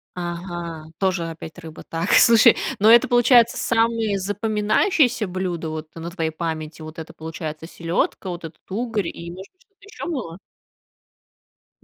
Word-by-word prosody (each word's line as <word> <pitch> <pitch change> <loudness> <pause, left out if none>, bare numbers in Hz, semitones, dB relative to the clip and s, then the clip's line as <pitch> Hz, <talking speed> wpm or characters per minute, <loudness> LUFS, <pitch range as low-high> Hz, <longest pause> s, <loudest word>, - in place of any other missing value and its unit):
Ага, 175 -2 -5
тоже 185 -4 0
опять 165 +1 -9
рыба. 160 -2 -10
Так, 165 +3 -3
слушай, 230 -2 +7 0.2
но 215 +2 +5
это, 235 - +7
получается, 240 -1 +5
самые 225 -3 +1
запоминающееся 215 - +1
блюдо 175 -3 -3
вот 155 0 -5
на 165 +1 -6
твоей 165 -3 -2
памяти. 160 -1 -5
Вот 155 +1 -9
это, 160 - -8
получается, 160 0 -6
селёдка, 170 +3 -2
вот 175 -1 -6
этот 160 - -10
угорь, 220 -4 -1
и, 170 0 -7
может 190 +2 -11
быть, 370 - -39
что-то 405 +1 -33
ещё 410 - -8
было? 235 - -4 1.4
Мгм. - - -30
180 Hz, 150 wpm, -22 LUFS, 165-225 Hz, 1.4 s, слушай